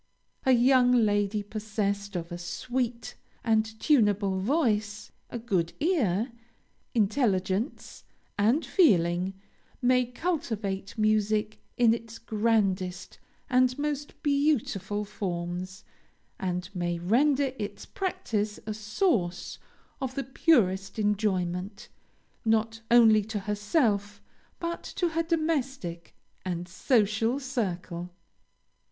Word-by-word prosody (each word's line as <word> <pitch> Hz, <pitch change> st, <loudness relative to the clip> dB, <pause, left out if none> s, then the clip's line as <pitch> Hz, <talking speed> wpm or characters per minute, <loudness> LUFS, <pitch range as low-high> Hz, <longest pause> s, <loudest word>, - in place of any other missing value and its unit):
A -, -, +6 dB
young 250 Hz, 0 st, +5 dB
lady 205 Hz, -3 st, +2 dB
possessed 205 Hz, -1 st, -3 dB
of 170 Hz, 0 st, -4 dB
a 175 Hz, -, -4 dB
sweet 245 Hz, +6 st, -3 dB, 0.3 s
and 220 Hz, -1 st, +1 dB
tunable 205 Hz, -8 st, +3 dB
voice, 215 Hz, -, 0 dB, 0.2 s
a -, -, -4 dB
good 190 Hz, -8 st, -1 dB
ear, 255 Hz, -, +1 dB, 0.6 s
intelligence, 210 Hz, -1 st, 0 dB, 0.3 s
and 225 Hz, +10 st, +2 dB
feeling, 185 Hz, -, +3 dB, 0.4 s
may 250 Hz, 0 st, +3 dB
cultivate 230 Hz, -, -3 dB
music 215 Hz, 0 st, +1 dB, 0.2 s
in 235 Hz, -2 st, +5 dB
its 230 Hz, -1 st, -6 dB
grandest 200 Hz, -5 st, 0 dB, 0.3 s
and 255 Hz, -1 st, +3 dB
most 290 Hz, 0 st, -3 dB
beautiful 240 Hz, -, +1 dB
forms, 185 Hz, -2 st, -4 dB, 0.6 s
and 180 Hz, -1 st, -2 dB
may 175 Hz, -1 st, -1 dB
render 260 Hz, -, +2 dB
its 205 Hz, -1 st, -5 dB
practice 230 Hz, -, -2 dB
a 215 Hz, -, -3 dB
source 210 Hz, -, -1 dB, 0.4 s
of 260 Hz, -1 st, -3 dB
the 275 Hz, -, -1 dB
purest 200 Hz, -, +2 dB
enjoyment, 200 Hz, -2 st, -1 dB, 0.5 s
not 225 Hz, 0 st, +1 dB
only 225 Hz, -3 st, +6 dB
to 215 Hz, -1 st, -4 dB
herself 205 Hz, -, 0 dB, 0.4 s
but 340 Hz, 0 st, -3 dB
to 350 Hz, -2 st, -1 dB
her 330 Hz, +1 st, 0 dB
domestic 275 Hz, -, -2 dB, 0.3 s
and 175 Hz, -1 st, -3 dB
social 225 Hz, +5 st, +1 dB
circle. 185 Hz, -9 st, -3 dB
215 Hz, 100 wpm, -28 LUFS, 195-250 Hz, 0.6 s, A